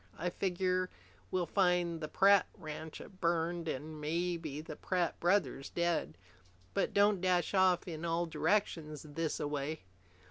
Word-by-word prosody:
I 175 +2 -1
figure 185 0 0 0.4
we'll 180 -1 0
find 175 -3 +2
the 155 - -2
Pratt 195 +4 +5
ranch 155 -1 -7 0.2
burned 170 -1 0
an' 155 +3 -5
maybe 165 -1 -2
the 155 0 -7
Pratt 180 0 -1
brothers 170 -7 +1
dead. 170 - 0 0.6
But - - +1
don't 200 -2 +4
dash 180 -2 +2
off 185 -2 +4
in 160 -2 -5
all 170 +1 +1
directions 160 -3 0
thisaway." 150 -1 -2
170 Hz, 130 wpm, -34 LUFS, 155-180 Hz, 0.6 s, Pratt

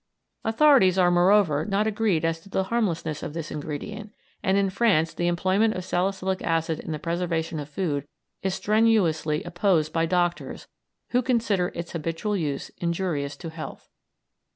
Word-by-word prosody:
Authorities 225 -5 +5
are, 180 -1 +4
moreover, 175 -4 +4
not 200 +3 0
agreed 210 -6 +1
as 165 0 0
to 180 - -17
the 190 - 0
harmlessness 180 -8 -1
of 150 - -6
this 165 -2 -5
ingredient, 180 +9 -6 0.3
and 190 +1 +2
in 195 -1 +2
France 185 -7 +2
the 175 - -1
employment 190 +5 +2
of 185 - -5
salicylic 190 +1 -1
acid 165 -1 0
in - - -6
the 155 - -2
preservation 165 -1 -2
of 145 0 -7
food 145 -4 -2 0.3
is 190 -1 -1
strenuously 195 -9 +2
opposed 175 -4 +1
by 165 0 +1
doctors, 175 0 -1 0.4
who 250 - +2
consider 225 -8 +1
its 170 0 -5
habitual 165 +6 -2
use 150 -7 -2
injurious 170 -5 -2
to 165 -2 -7
health. 160 -1 -8
175 Hz, 155 wpm, -25 LUFS, 160-200 Hz, 0.4 s, Authorities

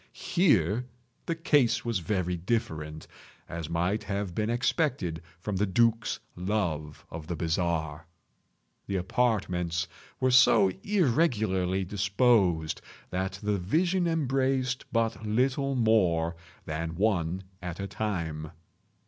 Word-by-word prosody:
Here 125 - +2 0.4
the 165 - 0
case 145 -8 +2
was 115 -5 0
very 90 0 -1
different; 85 -6 -3 0.4
as 85 -2 -5
might 90 +5 0
have 100 -2 -2
been 105 +3 -1
expected 120 - 0 0.2
from 95 +2 -3
the 105 +2 +1
duke's 115 +3 +2 0.2
love 90 -6 -2
of 80 -1 -7
the 85 - -2
bizarre. 80 -1 -1 0.8
The 100 - -2
apartments 90 -5 0 0.3
were 130 0 +2
so 125 -6 +6
irregularly 110 - +1
disposed 100 -4 +2 0.3
that 95 +1 -1
the 105 -1 0
vision 175 - +1
embraced 135 -4 0
but 115 -1 0
little 130 +5 +1
more 90 -8 +2 0.3
than 80 +1 -3
one 95 -2 0 0.2
at 90 0 -5
a 100 - -2
time. 85 -7 -3
100 Hz, 115 wpm, -28 LUFS, 85-120 Hz, 0.8 s, so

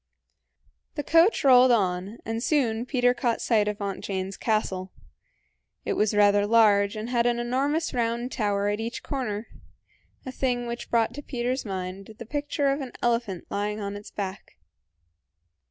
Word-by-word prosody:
The 295 - -2
coach 330 +5 +4
rolled 255 -2 +7
on, 195 -1 0
and 225 +1 -3
soon 245 -4 0
Peter 245 -2 +3
caught 240 -1 -1
sight 215 -3 +2
of 210 -1 -2
Aunt 200 -2 -4
Jane's 190 0 -3
castle. 190 -4 -1 0.9
It - - 0
was 210 0 +1
rather 205 0 +4
large, 210 -2 +4
and 220 +3 -5
had 240 -1 +2
an 240 0 +1
enormous 275 +7 -1
round 235 +1 -1
tower 205 -3 0
at 205 +1 -1
each 230 +2 -5
corner 230 -6 -3 0.8
a 260 - -5
thing 245 -2 -1
which 235 0 -6
brought 230 0 +2
to 290 - -7
Peter's 250 -1 -3
mind 190 +1 -6
the 235 - -8
picture 290 +3 -2
of 280 +2 -2
an 255 -3 -7
elephant 230 -6 0
lying 210 +1 -2
on 200 -1 -4
its 205 0 -9
back. 195 -1 -6
230 Hz, 160 wpm, -26 LUFS, 205-250 Hz, 0.9 s, rolled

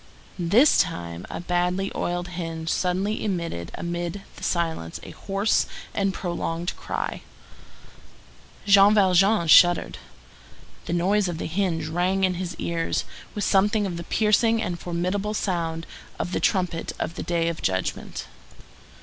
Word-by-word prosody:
This 205 - +5
time 85 0 -2
a - - -5
badly 180 +2 0
oiled 175 0 -2
hinge 165 -2 -4
suddenly 190 +5 0
emitted 170 - -3
amid 175 +3 -4
the - - -13
silence 165 - -2
a - - -9
hoarse 200 +2 0 0.3
and 195 -1 +1
prolonged 175 -2 -3
cry. - - -4 1.4
Jean 200 +1 +7
Valjean 195 -1 +4
shuddered. 175 +2 +6 0.9
The - - -1
noise 190 +3 +2
of 175 -2 -3
the - - -4
hinge 170 -2 -1
rang 180 +4 0
in 185 -1 +3
his 180 -1 -4
ears 165 -1 -2 0.3
with 205 - -2
something 205 +2 +3
of 175 -3 -3
the 170 - -5
piercing 225 +4 +2
and 175 -5 -3
formidable 185 +5 -2
sound 165 -4 -2 0.3
of 175 - -3
the - - 0
trump 185 -4 +1 0.2
of 165 - -3
the - - -6
Day 170 -1 0
of 170 -1 -3
Judgment. 95 -1 -2
175 Hz, 140 wpm, -25 LUFS, 170-195 Hz, 1.4 s, Jean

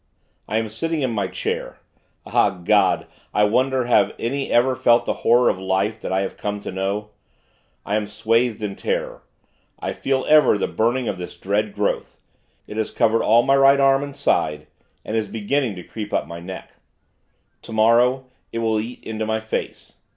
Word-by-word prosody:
I 110 - -1
am 110 0 -1
sitting 150 +8 -2
in 130 - 0
my 100 -4 -1
chair. - - -4 0.5
Ah, - - +3
God! 95 +2 +2 0.3
I 105 - +4
wonder 130 +4 +2
have 110 -5 +3
any 135 +4 -2
ever 130 +2 +3
felt 120 0 +3
the - - 0
horror 120 +1 +4
of 95 - +1
life 95 +3 -1
that - - -4
I 95 +1 +1
have 95 - -4
come 105 0 -3
to - - -6
know? 100 +3 -3 0.7
I 105 - -1
am 105 -1 -2
swathed 115 +1 0
in 100 -2 -3
terror. - - -3 0.6
I - - -3
feel 135 -1 -1
ever 150 -8 +5
the - - -1
burning 120 +2 0
of 95 - -3
this 90 0 -8
dread 100 +3 -1
growth. 105 0 -2 0.5
It 105 - -8
has 110 - -1
covered 115 0 +2
all 115 +2 +4
my 135 - +3
right 135 0 +5
arm 135 0 +4
and 140 -1 -6
side, 75 0 0 0.4
and 110 - -3
is 110 -2 0
beginning 115 +2 -1
to 90 - -8
creep 105 +1 -7
up - - +1
my 85 0 -8
neck. 95 +2 -9 0.8
Tomorrow, 120 +4 +2 0.3
it - - -5
will 110 -1 +1
eat 115 +3 -7
into 110 -1 -4
my 110 0 0
face. 110 0 -5
110 Hz, 185 wpm, -22 LUFS, 105-125 Hz, 0.8 s, ever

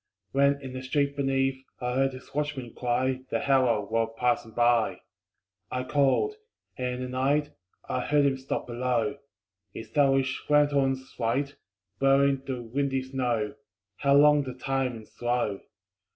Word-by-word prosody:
When 140 +1 +3
in 130 -1 -7
the 130 - -5
street 140 +2 0
beneath 135 -1 0 0.2
I 125 -1 -2
heard 135 +1 +1
his 130 +1 -12
watchman 145 -5 -3
cry 130 +1 0
The 115 - -2
hour, 120 -6 +3
while 115 +2 0
passing 120 0 0
by. 120 -1 +2 0.7
I 125 - -2
called. 145 - +2 0.4
And 125 -1 -2
in 125 - -6
the - - -3
night 140 +4 +1 0.4
I - - -1
heard 145 +3 +2
him 135 -1 +2
stop 130 - -3
below, 125 +3 -1 0.6
His 115 - -9
owlish 135 -2 +2
lanthorn's 140 -3 +2
light 135 +5 0 0.4
Blurring 135 0 +4
the 125 -3 -3
windy 135 +2 -1
snow 125 -5 -1 0.4
How 140 -1 +3
long 150 0 +6
the 130 -3 -6
time 135 0 -1
and 110 -1 -11
slow! 120 -5 -1
130 Hz, 150 wpm, -27 LUFS, 125-140 Hz, 0.7 s, long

